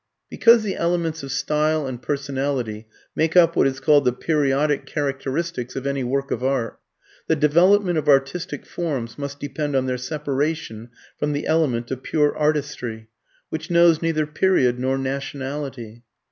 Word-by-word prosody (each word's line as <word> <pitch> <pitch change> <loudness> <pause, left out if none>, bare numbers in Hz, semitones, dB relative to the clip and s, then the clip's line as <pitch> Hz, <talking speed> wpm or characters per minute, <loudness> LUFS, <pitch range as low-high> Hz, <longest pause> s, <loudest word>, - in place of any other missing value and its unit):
Because 230 -2 +5
the 200 -3 -2
elements 170 -2 -1
of 135 -1 -6
style 150 +2 0
and 130 -2 -5
personality 135 -6 -3 0.3
make 160 +2 +1
up 170 -1 +6
what - - +4
is 135 0 -3
called 145 +1 +4
the 125 - +3
periodic 145 +1 0
characteristics 140 -1 -3
of 135 - -4
any 140 -1 -1
work 135 +2 -2
of 120 - -2
art, 130 -4 -1 0.5
the 160 - +3
"development" 175 +4 +4
of 150 0 -2
artistic 140 +2 +1
forms 140 -9 -4
must 140 0 -5
depend 145 +1 -3
on 130 -1 +2
their 125 -1 -2
separation 140 -4 -3 0.3
from 150 0 0
the 145 - -3
element 135 -8 +1
of 130 -1 -4
pure 150 +1 +1
artistry, 140 -7 -2 0.4
which 160 0 -5
knows 170 -2 +5
neither 160 -2 0
period 150 -6 +2
nor 130 +1 0
nationality. 135 -3 -5
145 Hz, 155 wpm, -22 LUFS, 130-155 Hz, 0.5 s, up